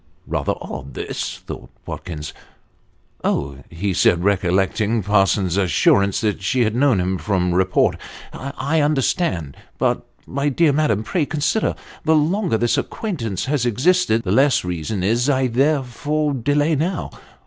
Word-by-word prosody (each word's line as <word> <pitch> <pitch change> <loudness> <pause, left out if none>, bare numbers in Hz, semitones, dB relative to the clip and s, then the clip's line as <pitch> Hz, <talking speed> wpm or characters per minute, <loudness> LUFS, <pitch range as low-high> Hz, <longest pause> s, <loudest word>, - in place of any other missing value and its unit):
' - - -36
Rather - - -1
odd, 70 - -8
this," - - -4
thought - - -8 0.2
Watkins. 75 -4 -6 0.5
' - - -38
Oh! 70 -1 -1
" - - -29
he 95 +4 -2
said, 85 0 +3
recollecting 100 +3 +1
Parsons's 95 -2 +2
assurance 100 +2 +3
that 105 -2 -1
she 125 +5 +1
had 110 -1 0
known 125 -4 +3
him 90 +1 -1
from 90 -4 0
report, 95 +1 +2 0.4
"I 140 +3 -2
understand. 135 - 0 0.2
But, - - 0 0.2
my 140 +2 -1
dear 150 +1 +3
madam, 125 -9 +1
pray, 155 +4 -1
con 150 -1 -4
sider. 215 +9 +1 0.3
The 160 0 +3
longer 165 - +1
this 120 +1 +1
acquaintance 115 - -3
has 140 -2 0
existed, 125 - +2
the 90 - -2
less 135 0 +3
reason 90 +3 -3
is 115 +6 +1
there 135 +2 +2
for 145 +4 -1
delay 145 +5 +1
now. 165 +3 -2
120 Hz, 150 wpm, -21 LUFS, 95-145 Hz, 0.5 s, said